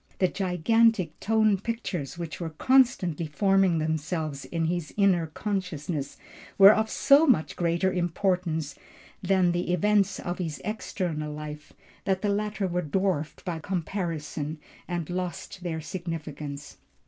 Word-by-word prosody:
The 185 - +3
gigantic 190 +1 +2
tone 215 -2 +3
pictures 185 - -4
which 170 -3 -5
were 170 -2 -3
constantly 185 - +2
forming 195 +1 +3
themselves 155 -2 -2
in 165 -1 -2
his 170 -1 -2
inner 185 -5 +3
consciousness 165 -5 -3 0.4
were 195 +1 +10
of 220 0 0
so 280 +6 +5
much 215 - +2
greater 175 +2 +1
importance 175 -4 0 0.5
than 185 -1 +3
the 175 +1 -1
events 200 +2 +2
of 175 +1 -4
his 160 -4 -3
external 175 -8 -3
life, 150 0 -8 0.3
that 190 0 0
the 205 - +2
latter 210 0 -1
were 180 0 -1
dwarfed 170 -2 -1
by 170 -2 -3
comparison 160 -4 -3 0.3
and 175 -3 -3
lost 180 0 -5
their 165 -3 -3
significance. 150 -4 -6
175 Hz, 130 wpm, -27 LUFS, 160-195 Hz, 0.5 s, were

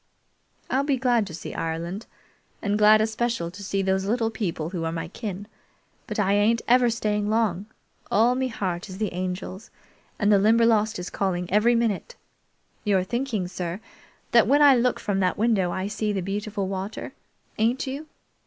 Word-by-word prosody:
"I'll 270 +2 +1
be 280 -2 +1
glad 240 -4 +2
to 170 - -9
see 160 - -7
Ireland, 170 +6 -4 0.5
and 205 -1 -1
glad 215 +1 +6
especial 220 -5 -1
to 200 +3 -10
see 195 0 -1
those 190 0 +1
little 225 +2 0
people 170 -7 -3
who 175 -3 -3
are 165 - -1
my 165 0 -4
kin, 205 -1 -6 0.6
but - - -4
I 200 -2 +2
ain't 215 +3 +2
ever 245 0 +5
staying 210 -2 -1
long. 215 -3 0 0.4
All 230 +4 +4
me 260 +1 0
heart 190 -6 -3
is 185 - -8
the 210 -2 -2
Angel's, 185 +2 -5 0.5
and 210 -1 +2
the 200 - +6
Limberlost 220 0 +3
is 180 0 -6
calling 180 -3 -1
every 230 +3 +4
minute. 230 - -1 0.7
You're 195 -4 +2
thinking, 235 -2 -2
sir, 180 0 -4 0.5
that 235 -2 +5
when 290 +4 +5
I 280 -2 +8
look 245 0 +1
from 200 -2 -1
that 185 -1 +1
window 210 -5 +2
I 185 +1 -2
see 210 +1 -2
the 195 -2 -1
beautiful 200 +1 -3
water, 195 +2 -5 0.5
ain't 235 +4 +1
you? 280 +4 -5
210 Hz, 175 wpm, -25 LUFS, 190-230 Hz, 0.7 s, I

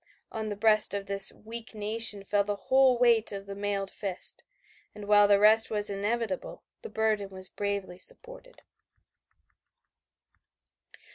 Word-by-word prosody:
On 220 -1 -5
the 205 - -5
breast 215 0 +3
of 200 -1 -5
this 195 -1 +6
weak 230 +1 -9
nation 215 -1 +2
fell 200 +1 0
the 205 0 -4
whole 260 +3 +2
weight 235 -2 +2
of 200 -1 -8
the 200 - -8
mailed 200 -1 -4
fist, 195 -3 -5 0.5
and 210 -1 -10
while 205 0 +5
the 200 -1 +3
result 220 +2 +4
was 210 -1 0
inevitable 205 0 -4 0.2
the 455 - -9
burden 215 - -2
was 185 -1 -8
bravely 200 -3 -5
supported. - - -6
210 Hz, 140 wpm, -27 LUFS, 200-225 Hz, 0.5 s, this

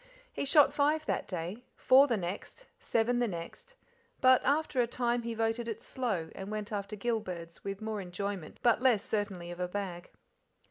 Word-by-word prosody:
He - - -2
shot 290 +1 +6
five 300 +2 +2
that - - -1
day, 180 +5 -5
four 270 +2 +6
the 235 -5 +1
next, 190 - -5
seven 240 +2 +1
the 240 - +2
next, 200 - -7 0.4
but 255 -1 +6
after 285 -2 +2
a 235 - +1
time 240 0 0
he 230 0 -4
voted 225 +1 0
it 225 -1 -5
slow, 200 -11 -2
and 195 +1 -7
went 215 0 -4
after 205 0 -3
gill 225 +2 0
birds, 170 -5 -8
with 200 +2 -5
more 215 -2 -3
enjoyment 185 -2 -5
but 240 0 +4
less 240 -6 +3
certainty 195 -5 -2
of 175 - -8
a 180 - 0
bag. 180 -2 -5
220 Hz, 185 wpm, -31 LUFS, 190-245 Hz, 0.4 s, shot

